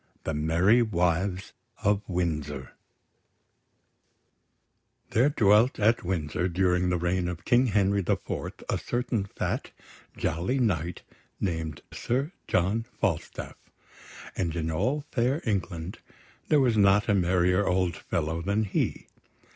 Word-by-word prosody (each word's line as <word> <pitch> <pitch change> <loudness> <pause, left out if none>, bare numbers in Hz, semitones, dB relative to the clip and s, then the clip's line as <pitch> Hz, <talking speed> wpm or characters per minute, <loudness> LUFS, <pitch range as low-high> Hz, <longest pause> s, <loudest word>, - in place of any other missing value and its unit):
THE 80 - -2
MERRY 85 +10 +3
WIVES 90 -2 0 0.3
OF 100 0 +3
WINDSOR 75 -7 -2 2.4
There 125 +6 +4
dwelt 110 -1 +4
at 110 +3 +3
Windsor 85 -1 -1
during 90 0 +1
the 90 - +1
reign 90 +1 0
of 90 -2 -6
King 125 +2 +4
Henry 100 -2 +2
the 85 - +1
Fourth - - -6
a - - 0
certain 120 -4 -1
fat, 100 - -3 0.5
jolly 85 +11 -1
knight 90 - -1 0.4
named 80 -5 -3
Sir 135 +7 -1 0.2
John 105 +6 +1
Falstaff; - - -3 0.7
and 85 -3 -1
in 80 -1 -2
all 130 - 0
fair 130 +4 +1
England 95 -5 -3 0.5
there 150 - +4
was 125 -4 +3
not 100 0 +4
a 105 - +3
merrier 90 +1 +2
old 90 -2 +1
fellow 80 +2 -2
than 100 +4 0
he. 100 - -1
95 Hz, 125 wpm, -27 LUFS, 85-110 Hz, 2.4 s, There